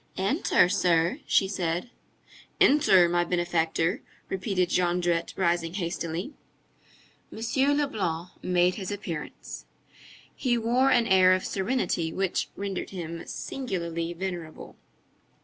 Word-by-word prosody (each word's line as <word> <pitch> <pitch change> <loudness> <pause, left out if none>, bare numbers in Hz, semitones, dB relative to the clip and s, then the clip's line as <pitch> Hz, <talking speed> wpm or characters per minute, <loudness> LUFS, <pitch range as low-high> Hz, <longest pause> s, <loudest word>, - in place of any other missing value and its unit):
"Enter, 195 - +3
sir," 170 -2 +2
she 195 - +3
said. 180 +3 -2 0.7
"Enter, 195 - +6
my 175 0 +2
benefactor," 175 0 0 0.3
repeated 190 -2 0
Jondrette, 175 -1 +1
rising 170 -2 0
hastily. 170 - -3 1.0
M. 265 +6 +1
Leblanc 185 - -2
made 180 0 +2
his 190 -2 -5
appearance. 185 -6 -6 0.7
He 245 -3 0
wore 240 +4 +2
an 235 - +4
air 185 -2 +6
of 185 - -1
serenity 190 -6 -1
which 190 +1 -1
rendered 200 -2 -4
him 170 -3 -6
singularly 170 -9 -4
venerable. 175 -3 -6
180 Hz, 105 wpm, -27 LUFS, 170-205 Hz, 1.0 s, Enter